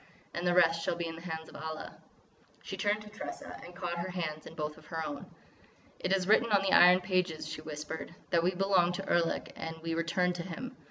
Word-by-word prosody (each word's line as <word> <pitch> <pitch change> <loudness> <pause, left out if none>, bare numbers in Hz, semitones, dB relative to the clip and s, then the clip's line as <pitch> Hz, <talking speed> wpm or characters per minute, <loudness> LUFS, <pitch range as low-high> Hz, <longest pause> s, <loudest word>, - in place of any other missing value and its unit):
And 175 +1 -1
the 175 - +3
rest 165 -2 +5
shall - - 0
be 170 0 -2
in 165 - -4
the 165 - -9
hands 160 -2 -5
of - - -14
Allah." 160 0 -5 0.7
She 195 - -5
turned 205 +2 +1
to 210 - -11
Tressa 210 - -7
and 175 - -11
caught 175 -2 -3
her 180 +2 -2
hands 160 -4 -3
in 160 - -10
both 150 0 -4
of 155 - -18
her 160 -1 -3
own: 145 -2 -5 0.7
"It 185 - -1
is 190 -1 +2
written 220 +2 +5
on 200 -1 +5
the 195 - +1
Iron 180 +1 +8
Pages," 180 -3 0
she - - -5
whispered, 155 +2 -6 0.2
"that 170 -2 +4
we 180 +2 +1
belong 185 -2 +3
to 195 +2 -4
Erlik 170 -1 +1
and 160 0 -5
we 165 0 -1
return 180 +2 +1
to 175 - -4
him. 235 +9 -6
175 Hz, 230 wpm, -32 LUFS, 165-185 Hz, 0.7 s, Iron